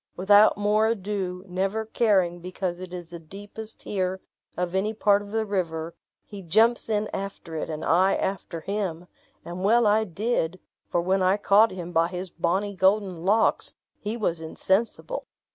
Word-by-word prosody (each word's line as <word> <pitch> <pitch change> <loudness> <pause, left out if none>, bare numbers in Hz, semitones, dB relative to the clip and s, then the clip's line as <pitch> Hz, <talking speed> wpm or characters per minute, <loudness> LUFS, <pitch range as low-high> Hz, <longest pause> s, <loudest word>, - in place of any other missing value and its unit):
Without 205 +3 +5
more 210 +1 +2
ado, 195 -4 -3
never 195 +4 -1
caring 195 -6 +2
because 180 0 -4
it 185 -1 -8
is 175 -2 -8
the 170 - -7
deepest 205 +6 -9
here 190 -2 -2 0.4
of 180 0 -2
any 205 +3 0
part 205 -1 +3
of 205 - -10
the 220 +1 -1
river, 170 -5 -2 0.3
he 205 -2 -9
jumps 220 +8 +3
in 215 -1 0
after 195 -4 -6
it, 155 - -3
and 155 0 -4
I 185 +3 +4
after 185 -3 -3
him; 185 -3 -3 0.4
and 175 +2 -6
well 230 +3 +4
I 215 +1 +3
did, 185 -2 -1 0.3
for 175 - +1
when 190 +2 +1
I 185 +2 +3
caught 210 +2 +5
him 175 -2 -7
by 165 0 +3
his 180 0 -6
bonny 190 +4 -1
golden 190 0 +2
locks, 195 +7 +2 0.2
he 210 +3 -4
was 170 -7 -1
insensible. 205 - -1
190 Hz, 165 wpm, -25 LUFS, 175-210 Hz, 0.4 s, Without